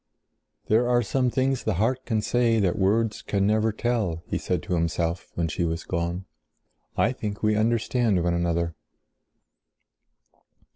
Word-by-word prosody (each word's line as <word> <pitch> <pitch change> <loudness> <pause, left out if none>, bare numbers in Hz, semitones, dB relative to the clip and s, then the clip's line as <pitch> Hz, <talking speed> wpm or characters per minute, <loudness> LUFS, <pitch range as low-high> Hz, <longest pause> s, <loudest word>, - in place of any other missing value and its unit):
"There 120 +3 +3
are 120 0 +3
some 125 +3 +1
things 130 +1 0
the 110 - 0
heart 125 +7 0
can 110 -3 0
say 115 -1 +2
that 95 -4 +2
words 105 +3 +1
can 100 -1 0
never 110 +1 +2
tell," 105 -7 -1
he - - -2
said - - -2
to - - -3
himself 85 0 -1
when 85 -1 0
she 85 +3 -2
was 80 0 -2
gone. 85 +1 -3 0.7
"I 115 - +3
think 105 -5 -5
we 105 0 +3
understand 115 -3 +1
one 85 0 +1
another." 85 -1 0
105 Hz, 150 wpm, -25 LUFS, 85-115 Hz, 0.7 s, There